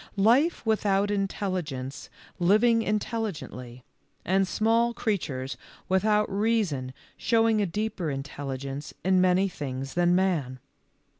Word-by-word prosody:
Life 240 - +3
without 205 -2 +1
intelligence 185 -9 -3 0.3
living 215 +6 +4
intelligently, 195 - -4 0.4
and 190 +1 +2
small 230 +5 +2
creatures 140 - -2 0.3
without 210 +3 +2
reason 195 - 0 0.3
showing 225 -2 +2
a 200 - +1
deeper 205 -2 -2
intelligence 135 0 -5
in 185 -1 +4
many 185 +1 +3
things 135 -6 -5
than 175 0 +3
man. 165 -9 0
190 Hz, 100 wpm, -27 LUFS, 145-215 Hz, 0.4 s, living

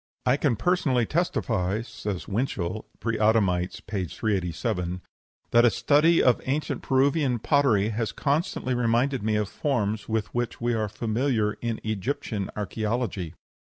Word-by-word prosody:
'" - - -50
"I 125 +1 +4
can 140 -4 +1
personally 135 - +1
testify" 110 - 0
(says 105 -5 -5
Winchell, 105 -3 -2
"Preadamites," 105 -6 +1
p. 100 -4 -2
387) 90 -2 -2 0.5
"that 120 0 +6
a 120 - +7
study 155 +8 +4
of 125 - +4
ancient 145 +4 -1
Peruvian 135 -1 +2
pottery 115 -6 +2
has 110 0 -2
constantly 145 -3 -1
reminded 125 +2 +1
me 110 +1 0
of 105 -1 0
forms 110 -5 -1
with 110 -1 -1
which 120 -1 -2
we 120 0 0
are 110 -2 -1
familiar 110 0 0
in 115 -2 -2
Egyptian 110 -1 -2
archæology." 105 -4 -2
115 Hz, 135 wpm, -26 LUFS, 105-130 Hz, 0.5 s, a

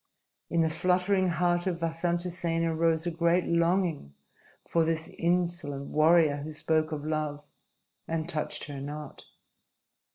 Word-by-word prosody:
In 170 - +2
the 160 - +2
fluttering 185 +3 +2
heart 175 +1 +1
of 175 -2 -1
Vasantasena 165 0 -1
rose 165 0 +2
a 175 - 0
great 170 +2 +2
longing 170 - 0 0.5
for 165 - +2
this 160 0 0
insolent 170 -5 -1
warrior 155 -1 +4
who 145 +2 -6
spoke 155 +1 0
of 150 -1 -4
love 155 -2 -2 0.6
and 160 -1 -2
touched 155 -3 -2
her 145 -2 -6
not. 150 +2 -7
165 Hz, 130 wpm, -28 LUFS, 155-175 Hz, 0.6 s, warrior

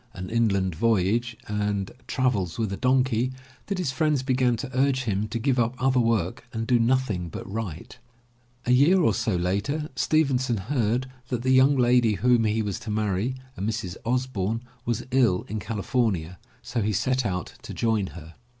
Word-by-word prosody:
An 90 +2 -6
Inland 100 -5 +1
Voyage, 115 +5 +1
and 105 -2 -1 0.2
Travels 115 - 0
With 110 -4 -1
A - - -3
Donkey, 130 -1 +2 0.4
that 200 - -2
his 180 -8 -1
friends 145 0 +1
began 130 -2 +2
to 120 - -6
urge 130 0 +2
him 105 -2 -1
to 115 - -3
give 125 +2 +1
up 120 +1 +1
other 130 0 +2
work 115 -7 0
and 115 -1 -3
do 120 0 +3
nothing 115 -8 +1
but - - -7
write. 100 +1 -6 0.7
A 125 - +1
year 145 +9 +5
or 135 - +3
so 100 +1 0
later, 100 - -1
Stevenson 130 -4 +2
heard 120 +3 0 0.2
that 120 -1 -3
the 130 - +2
young 130 +2 +6
lady 120 -3 +4
whom 120 +3 +3
he 110 +1 +1
was 100 -3 -3
to 115 - -8
marry, 105 +3 0 0.2
a - - -8
Mrs. 105 -3 -2
Osboume, 115 -3 -1 0.2
was 120 -2 -1
ill 120 -8 +3
in 110 +2 -3
California, 100 -6 -1 0.2
so 115 - -2
he 105 +1 0
set 125 +6 +1
out 90 -5 -3
to - - -8
join 110 -4 0
her. 80 +1 -11
115 Hz, 175 wpm, -25 LUFS, 100-130 Hz, 0.7 s, young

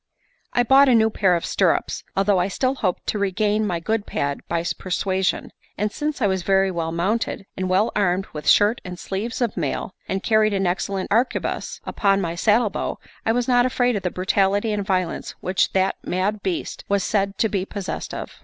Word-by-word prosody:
IV 245 - +5
I - - +3
bought 270 +3 +6
a 245 - +5
new 220 0 +4
pair 190 -4 +3
of 170 - -2
stirrups, - - +1
although 195 -1 +3
I 180 - +1
still 255 +7 0
hoped 190 -9 -2
to 210 - -1
regain 210 +2 +1
my 175 -3 -1
good 210 +5 -2
pad 140 0 -2
by 170 -1 -1 0.2
persuasion; 185 +1 -1 0.3
and 210 +1 0
since 295 -1 -3
I - - +4
was 190 -2 +1
very 195 +1 +2
well 165 -2 -2
mounted, 195 +5 -1
and 185 0 -2
well 195 +5 +2
armed 190 -2 +1
with 150 -1 -1
shirt 210 +3 +4
and 180 -1 -7
sleeves 210 +8 -4
of 235 -3 0
mail, 165 +2 -3 0.2
and 190 0 -2
carried 215 -2 +3
an 195 0 0
excellent 185 +2 -2
arquebuse 235 +5 0
upon 200 -2 +2
my 170 -3 -2
saddle 210 +4 +2
bow, - - -3 0.3
I - - +4
was 245 +1 0
not 245 -1 +4
afraid 245 -1 +1
of 200 - -1
the 180 - -1
brutality 195 +4 +1
and 205 -1 -1
violence 185 -3 -2
which 185 0 +1
that 190 0 +1
mad 200 +3 -1
beast 185 -3 -3
was 200 -1 +2
said 200 -1 0
to 225 - +2
be 200 -3 -1
possessed 195 -1 -5
of. - - -7
195 Hz, 205 wpm, -22 LUFS, 185-215 Hz, 0.3 s, bought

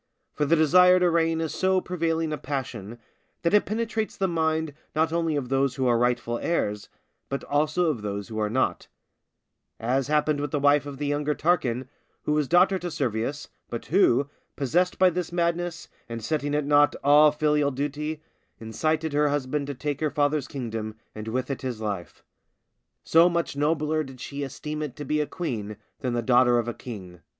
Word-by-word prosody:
For 150 - 0
the 165 - +4
desire 180 +4 +6
to 180 -1 +3
reign 165 -1 +2
is 160 - -2
so 190 0 +2
prevailing 165 -3 -1
a - - -2
passion, 125 -6 -5 0.5
that 170 - +1
it 210 - +4
penetrates 220 0 -2
the 190 - +1
minds 160 -2 0 0.2
not 160 +1 +1
only 165 -2 0
of 135 -4 -2
those 135 -1 +1
who 130 - -1
are 120 -1 +4
rightful 120 -1 0
heirs, 105 -11 -1 0.4
but 140 - -3
also 155 +4 +1
of 120 -8 -5
those 100 -1 -4
who 110 -1 -5
are 105 -1 0
not; 130 +5 0 0.9
as 130 +3 0
happened 150 0 +1
with 145 0 -2
the 145 - -1
wife 145 +1 +3
of 140 -1 -7
the 145 - -3
younger 145 +1 0
Tarquin, 130 -8 0 0.4
who - - -1
was 150 -2 +1
daughter 185 +4 +4
to 175 - -4
Servius, 135 0 -2 0.2
but 120 - -5
who, 145 -7 +3 0.3
possessed 175 +7 +1
by 185 -1 +5
this 175 0 -3
madness, 170 0 -1 0.2
and 115 -1 -5
setting 145 +1 -1
at 150 -1 0
naught 145 0 +4
all 150 +1 +7
filial 150 -1 +2
duty, 150 +3 -4 0.4
incited 155 +8 -1
her 150 0 +3
husband 140 0 -1
to 145 - -4
take 145 +1 -3
her 155 - 0
father's 145 0 0
kingdom, 110 -5 -5 0.2
and 110 0 -7
with 130 +4 -2
it 140 - -4
his 125 -4 -4
life; 100 -5 -5 0.8
so 165 +2 +5
much 170 -4 -1
nobler 155 +1 +1
did 135 -3 -11
she 140 +3 -6
esteem 150 +3 -5
it 150 -5 -4
to 145 - -7
be 150 +3 +1
a 150 - -2
queen 110 - -4 0.2
than 125 -2 -2
the 120 -1 -1
daughter 125 0 +4
of 120 -1 0
a 120 - -2
king. 95 -9 -9
145 Hz, 190 wpm, -26 LUFS, 125-160 Hz, 0.9 s, all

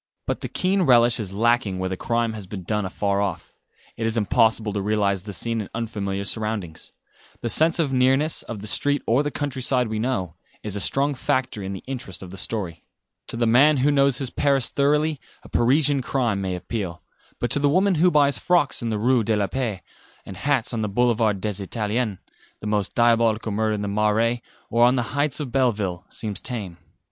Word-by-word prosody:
But - - -2
the - - -3
keen 190 +1 +1
relish 120 -7 +4
is 100 -4 -4
lacking 115 -1 +1
where 95 0 -2
the 95 - -2
crime 115 +3 -1
has 105 -4 -8
been 95 -1 -7
done 105 +2 -1
afar 100 +1 -1
off. 95 -4 -4 0.4
It 115 - -1
is 115 +1 -1
impossible 110 +1 +2
to 100 - -1
realise 100 -2 +1
the 105 +2 -8
scene 115 +5 -2
in 100 - -8
unfamiliar 100 -4 -3
surroundings. 105 -6 -3 0.5
The 120 - -2
sense 160 +7 +3
of 150 -6 0
nearness, 135 +4 +2
of 110 -4 -7
the 105 - -7
street 145 +7 +1
or 120 +5 +3
the 145 - -1
countryside 130 -4 -1
we 110 0 -2
know, 110 -9 -2 0.3
is 105 -2 -4
a - - -2
strong 140 +6 +1
factor 130 -4 -1
in 95 0 -4
the 95 - -8
interest 120 -9 -6
of 90 - -10
the 95 - -9
story. 90 -8 -4 0.4
To - - -4
the 120 - +1
man 140 +6 +5
who 145 - +4
knows 140 -3 +3
his 135 -3 -2
Paris 140 -3 +2
thoroughly 150 +1 +1 0.2
a - - -13
Parisian 140 +3 +3
crime 120 -6 -1
may 95 -1 -2
appeal; 90 -1 -5 0.4
but 120 - -2
to - - +3
the 145 0 +3
woman 190 +6 +3
who 180 - +6
buys 145 -6 +3
frocks 175 -6 +2
in 115 - -2
the 110 - -1
Rue 120 +2 +2
de 110 +1 +1
la 100 - +1
Paix, 110 -6 -3 0.4
and 95 - -8
hats 130 +3 0
on 115 - -1
the 105 - -1
Boulevard 110 -2 +2
des 105 -1 -2
Italiens, 105 +1 -2 0.4
the - - -10
most 105 -2 -1
diabolical 115 -2 +2
murder 110 +1 0
in 105 - -4
the - - -2
Marais, 105 +3 +1 0.3
or 120 0 +4
on 125 +2 +5
the 120 0 -2
heights 145 0 +1
of 140 -5 -4
Belleville, 105 -9 0
seems 105 -4 -3
tame. 105 -9 -4
115 Hz, 210 wpm, -23 LUFS, 100-130 Hz, 0.5 s, who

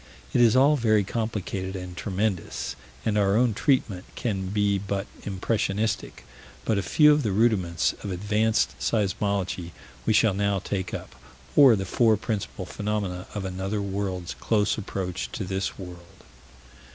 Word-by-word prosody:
It 120 - +4
is 115 -1 +5
all 140 +3 +6
very 110 -4 +3
complicated 100 -3 -3
and 90 -1 -6
tremendous, 95 -1 -2 0.3
and 105 -1 +2
our 100 +1 +3
own 120 -1 +3
treatment 105 - +1
can 95 -6 -2
be 100 0 +1
but 100 0 -3 0.2
impressionistic, 105 +2 -1 0.4
but 110 -3 +2
a - - 0
few 150 - +5
of 150 - +2
the 110 -6 -1
rudiments 95 -6 +2
of 100 - -4
Advanced 105 +4 +1
Seismology 100 -4 -1 0.4
we - - +4
shall 110 -1 +4
now 100 0 +1
take 95 0 -3
up - - -6 0.4
or 135 -5 +8
the 95 -1 -3
four 110 +3 +3
principal 100 -3 -4
phenomena 100 -2 -3
of 100 -2 -3
another 95 +3 -2
world's 95 -2 -3
close 105 -2 +2
approach 95 -3 -4
to - - -3
this 95 +1 -3
world. 90 -2 -11
100 Hz, 150 wpm, -26 LUFS, 95-110 Hz, 0.4 s, or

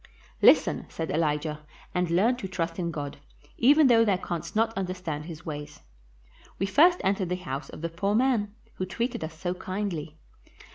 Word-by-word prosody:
"Listen," - - +5
said 160 - -4
Elijah, 150 -1 0 0.3
"and 180 -1 0
learn 200 +9 +3
to 195 - -5
trust 170 -2 -3
in 170 -1 -1
God, 145 -3 -5 0.4
even 290 +5 +6
though 235 -3 +6
thou 200 -4 +2
canst 175 -1 -5
not 225 +1 +2
understand 180 -5 -3
his 165 0 -9
ways. 150 -2 -7 0.8
We 195 - 0
first 335 - +5
entered 195 -2 +1
the 180 - 0
house 140 -6 -5
of - - -10
the 170 - -2
poor 195 +5 -1
man, 230 -4 +2 0.3
who 185 - -2
treated 235 0 -2
us 160 0 -6
so 175 +1 -2
kindly. 185 -5 -4
180 Hz, 175 wpm, -27 LUFS, 160-205 Hz, 0.8 s, even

